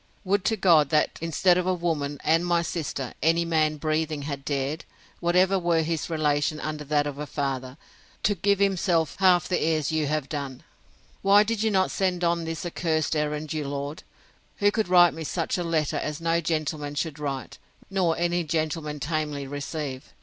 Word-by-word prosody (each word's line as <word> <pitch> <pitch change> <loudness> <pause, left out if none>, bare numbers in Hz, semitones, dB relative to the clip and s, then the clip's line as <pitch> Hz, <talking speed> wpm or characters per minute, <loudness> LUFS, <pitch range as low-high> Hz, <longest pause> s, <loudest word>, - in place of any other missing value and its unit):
—Would 200 +1 +1
to 220 - +1
God, 165 -7 +5
that, 155 -1 +1
instead 175 +2 +3
of 180 - -2
a 185 - +2
woman, 155 -5 -2
and 165 +2 +3
my 175 -1 +2
sister, 145 -6 -4
any 165 +2 +3
man 155 -2 +1
breathing 155 -1 -1
had 140 -1 -5
dared, 140 +3 -2 0.4
whatever 185 +3 +3
were 170 -2 +2
his 165 0 -2
relation 155 -1 0
under 155 -1 -4
that 145 0 +1
of 145 -1 -5
a 150 - -4
father, 135 -2 -3 0.5
to 205 - +3
give 200 +2 +1
himself 185 -5 +1
half 180 -3 +4
the 180 - 0
airs 155 -2 +1
you 155 -2 0
have 150 -1 -1
done!—Why 150 +8 -1
did 220 0 -2
you 220 - +2
not 190 -2 +2
send 180 -2 0
on 170 -1 +1
this 165 +1 -4
accursed 160 -2 -1
errand 150 0 -2
your 150 -2 -3
lord, 140 +2 -4 0.6
who 205 -1 +3
could 220 -1 0
write 175 -3 +6
me 160 +1 -6
such 165 +3 -2
a - - -1
letter 160 -3 0
as 150 -1 -3
no 165 0 +1
gentleman 155 -2 -2
should 155 0 -3
write, 140 -3 -5 0.3
nor 180 -4 +1
any 175 +1 +1
gentleman 155 -1 -2
tamely 150 -1 -2
receive? 140 -1 -5
160 Hz, 180 wpm, -26 LUFS, 150-175 Hz, 0.6 s, write